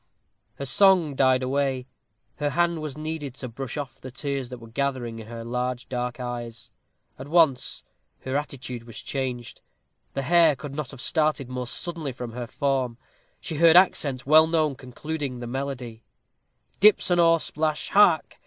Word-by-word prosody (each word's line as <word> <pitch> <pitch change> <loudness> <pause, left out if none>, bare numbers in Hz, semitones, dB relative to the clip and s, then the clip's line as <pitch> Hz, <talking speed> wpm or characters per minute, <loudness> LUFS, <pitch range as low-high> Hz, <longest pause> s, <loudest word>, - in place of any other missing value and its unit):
Her 140 - -5
song 180 0 +4
died 130 -1 +3
away. 135 -1 0 0.5
Her 145 0 0
hand 170 +1 +1
was 150 -2 -6
needed 155 -4 -5
to 130 - -6
brush 130 +4 -6
off 135 -3 -6
the 130 - -7
tears 135 -1 -4
that 125 - -7
were 115 -1 -12
gathering 120 -2 -2
in 110 - -10
her 115 0 -7
large 125 +1 -3
dark 125 0 -3
eyes. 120 -2 -6 0.5
At 130 - -7
once 155 -5 +2 0.4
her 130 +1 -4
attitude 130 -4 -4
was 115 -2 -11
changed. 125 -3 -4 0.5
The 135 - -1
hare 165 +1 +5
could 140 +1 -8
not 145 -3 -4
have 135 - -9
started 155 -5 +1
more 125 -1 -4
suddenly 160 0 -5
from 120 -1 -6
her 120 0 -6
form. 130 -2 -1 0.4
She 160 - -5
heard 165 +1 +7
accents 140 -8 +3
well 155 +3 +7
known 155 -3 +1
concluding 135 +1 -5
the 120 - -6
melody: 125 -3 -5 0.8
Dips 205 -2 +5
an 175 - +3
oar 165 -1 +6
plash 155 -1 -2
hark! 185 -6 +4
135 Hz, 165 wpm, -25 LUFS, 125-155 Hz, 0.8 s, heard